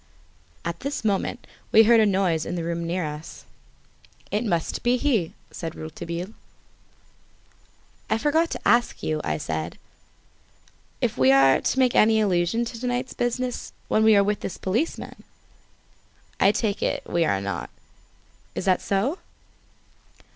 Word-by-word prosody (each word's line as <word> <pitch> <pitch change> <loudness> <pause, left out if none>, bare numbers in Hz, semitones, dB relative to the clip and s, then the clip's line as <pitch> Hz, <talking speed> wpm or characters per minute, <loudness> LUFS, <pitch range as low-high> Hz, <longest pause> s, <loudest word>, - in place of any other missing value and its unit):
At 170 0 -3
this 280 -4 -4
moment 210 +4 -1 0.3
we 225 - +8
heard 230 +1 +6
a 215 - +5
noise 185 -5 +1
in - - -4
the 170 - -3
room 170 0 -3
near 175 0 -1
us. 150 +2 -8 0.9
"It 210 +3 0
must 170 -8 -1
be 245 +1 +2
he," 235 - 0 0.2
said 165 -1 -6
Rouletabille. 170 +5 -6 1.8
"I 220 - +2
forgot 315 +6 +2
to - - -4
ask 240 0 +2
you," 155 -1 -1
I 75 -1 -1
said, 80 +2 -4 1.2
"if - - -1
we 130 0 +6
are 135 0 +5
to - - -1
make 255 -2 +3
any 220 +1 +5
allusion 200 +3 +1
to 230 0 -7
to 250 - -2
night's 245 +1 -2
business 245 +1 -2 0.2
when 220 - +3
we 220 -1 +6
are 200 - +5
with 205 0 0
this - - -5
policeman. 225 - -3 1.2
I 195 - +5
take 210 -1 -1
it - - -1
we 170 - +1
are 100 -11 +1
not. 100 +1 -4 0.9
Is - - -3
that 185 -2 +3
so?" 225 - 0
195 Hz, 150 wpm, -24 LUFS, 170-235 Hz, 1.8 s, we